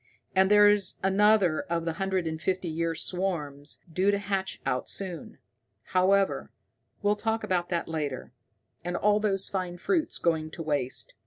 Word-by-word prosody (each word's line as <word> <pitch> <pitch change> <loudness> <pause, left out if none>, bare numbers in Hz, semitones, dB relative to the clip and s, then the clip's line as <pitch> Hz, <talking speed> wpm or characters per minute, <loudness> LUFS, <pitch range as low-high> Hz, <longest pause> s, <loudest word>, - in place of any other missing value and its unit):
And 190 0 +5
there's 205 -1 +5
another 195 -3 +4
of 165 -1 -2
the 165 - -1
hundred 190 -2 0
and 160 0 -4
fifty 185 -1 -1
year 165 +1 -1
swarms 155 -6 -2
due 185 +4 +2
to 200 - +3
hatch 195 -1 -3
out 125 - -1
soon. 180 -5 -5 0.6
However, 195 +1 +2 0.5
we'll 205 +1 +3
talk 225 +1 -1
about 175 -2 0
that 170 -1 -1
later. 150 -7 -4 0.5
And 175 +1 -3
all 210 0 +3
those 195 -3 0
fine 185 -2 -3
fruits 325 - 0
going 160 -2 0
to 165 - -7
waste! 145 -5 -1
185 Hz, 155 wpm, -28 LUFS, 165-200 Hz, 0.6 s, And